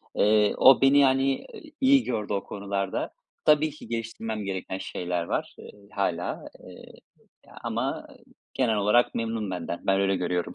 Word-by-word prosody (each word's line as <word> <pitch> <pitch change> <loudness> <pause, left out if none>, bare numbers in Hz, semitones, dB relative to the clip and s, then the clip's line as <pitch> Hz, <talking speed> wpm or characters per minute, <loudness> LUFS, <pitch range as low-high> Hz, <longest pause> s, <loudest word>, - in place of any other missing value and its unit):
eee, 105 0 +3
o 135 0 +7
beni, 135 +1 +6
yani, 135 0 +2 0.4
iyi 270 0 +5
gördü 105 -4 -3
o 100 - -1
konularda. 100 -1 -3 0.3
Tabii 150 0 +4
ki 150 - -12
geliştirmem 115 -2 -4
gereken 95 0 -4
şeyler 90 -2 -3
var, - - -3
eee, - - -11 0.2
hâlâ, 90 -3 -2 0.2
eee, - - -13 0.7
ama, - - -1 0.2
ııı, - - -16 0.4
genel 115 -4 +1
olarak 105 +4 +3
memnun 115 -3 -2
benden. 85 -1 -4
Ben 95 0 +3
öyle 95 0 +2
görüyorum. 90 -1 -2
105 Hz, 150 wpm, -26 LUFS, 95-130 Hz, 0.7 s, o